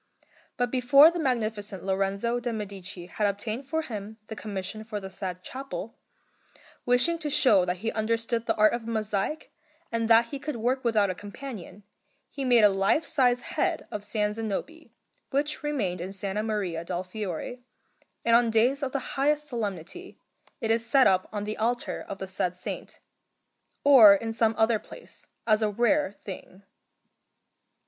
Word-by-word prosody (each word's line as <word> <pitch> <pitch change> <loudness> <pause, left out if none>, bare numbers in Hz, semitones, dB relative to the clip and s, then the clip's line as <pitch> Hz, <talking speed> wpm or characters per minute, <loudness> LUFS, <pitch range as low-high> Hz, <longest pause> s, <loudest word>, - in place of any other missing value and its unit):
But 245 -1 0
before 270 +5 +7
the 345 - -4
Magnificent 215 - -2
Lorenzo 195 +5 0
de' 240 0 -3
Medici 195 -4 -6
had 205 +4 -1
obtained 215 +6 -3
for 320 0 0
him 215 -4 -7
the 220 - -5
commission 210 0 -5
for 215 -1 -5
the 190 -1 -8
said 185 -1 -6
chapel, 245 -6 -6 0.9
wishing 255 +8 +3
to 305 -2 -3
show 220 -10 +4
that 180 0 -1
he 225 - +1
understood 230 +1 -1
the - - +2
art 215 0 +4
of 235 -1 -4
mosaic, 220 +6 -2 0.4
and 230 -1 -1
that 230 +1 +6
he 280 - -5
could 295 0 -4
work 250 +3 0
without 215 -5 +2
a - - -3
companion, 205 0 -9 0.5
he 275 - -5
made 245 -3 +5
a 210 - +8
life 195 +11 +2
size 250 -5 +2
head - - -2
of 210 - -4
S. 210 0 -1
Zanobi, 225 +10 -4 0.4
which 295 +2 0
remained 215 - -2
in 180 - -4
S. 195 0 -7
Maria 200 -4 -2
del 175 +1 -3
Fiore, 200 +4 -5 0.6
and 230 0 +5
on 235 0 +4
days 240 +6 +2
of 270 -2 -3
the 275 -3 -3
highest 295 +2 +1
solemnity 230 - -5 0.4
it 225 - 0
is 225 0 +2
set 260 +3 +4
up 185 -1 +3
on 205 -1 -3
the 215 +1 -4
altar 240 +2 -1
of 195 - -5
the 190 - -5
said 180 -1 -2
Saint, 180 - -7 0.9
or 240 -8 +9
in 225 +3 -3
some 225 -1 +2
other 220 0 +3
place, - - -11 0.2
as 215 -1 +3
a 215 - +2
rare 240 +4 +2
thing. 195 -1 -10
220 Hz, 170 wpm, -27 LUFS, 200-250 Hz, 0.9 s, or